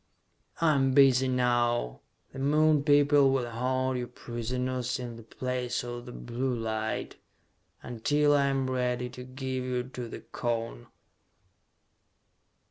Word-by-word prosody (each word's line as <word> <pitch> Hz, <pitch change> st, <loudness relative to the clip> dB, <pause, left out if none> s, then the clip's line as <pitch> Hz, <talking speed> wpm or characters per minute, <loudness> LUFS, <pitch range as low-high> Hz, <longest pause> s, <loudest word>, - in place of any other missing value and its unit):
"I 165 Hz, -2 st, +4 dB
am 135 Hz, -2 st, +2 dB
busy 130 Hz, -2 st, +5 dB
now. 120 Hz, -, +1 dB, 0.3 s
The 135 Hz, -, -7 dB
Moon 150 Hz, +1 st, +3 dB
people 145 Hz, -1 st, +5 dB
will 130 Hz, -3 st, 0 dB
hold 130 Hz, +2 st, -1 dB
you 120 Hz, -, -4 dB
prisoners 125 Hz, +1 st, -3 dB
in 120 Hz, -2 st, -6 dB
the 115 Hz, -, -10 dB
Place 125 Hz, +2 st, -3 dB
of 120 Hz, 0 st, -7 dB
the -, -, -7 dB
Blue 125 Hz, +2 st, -3 dB
light, 110 Hz, -1 st, -3 dB, 0.7 s
until 145 Hz, +5 st, +1 dB
I 140 Hz, -1 st, +3 dB
am 135 Hz, -1 st, 0 dB
ready 125 Hz, -1 st, -1 dB
to 125 Hz, -, -9 dB
give 130 Hz, 0 st, -4 dB
you 125 Hz, -1 st, -1 dB
to 125 Hz, -1 st, -7 dB
the -, -, -8 dB
Cone!" 115 Hz, -, -4 dB
125 Hz, 130 wpm, -29 LUFS, 120-135 Hz, 0.7 s, busy